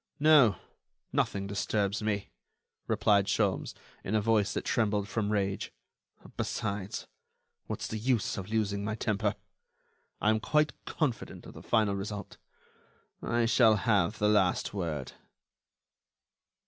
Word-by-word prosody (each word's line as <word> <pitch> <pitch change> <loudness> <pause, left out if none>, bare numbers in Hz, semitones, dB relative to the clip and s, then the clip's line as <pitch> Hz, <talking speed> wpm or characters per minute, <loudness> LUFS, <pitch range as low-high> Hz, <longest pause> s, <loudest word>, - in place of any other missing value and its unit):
"No, 145 - +6 0.6
nothing 100 -1 0
disturbs 100 +1 -1
me," 105 -2 -2 0.6
replied 100 -2 +3
Sholmes, - - 0 0.3
in 105 - -1
a - - +4
voice 105 -2 +2
that - - -2
trembled 105 -3 +1
from 105 0 -1
rage; 100 -2 -1 0.7
"besides, 100 -2 -3 0.6
what's - - -4
the 110 - -4
use 120 -2 0
of 95 0 -6
losing 105 -2 0
my 110 +1 -2
temper?... 105 -1 0 0.8
I 105 - +3
am 110 - +1
quite 150 +6 +2
confident 135 -9 -3
of - - -11
the - - -11
final 110 -4 +2
result; 100 +1 -6 0.8
I 120 0 +1
shall 115 -1 +5
have 100 -5 +1
the 105 - +2
last 100 -4 +2
word." 80 -9 -3
105 Hz, 125 wpm, -30 LUFS, 100-110 Hz, 0.8 s, No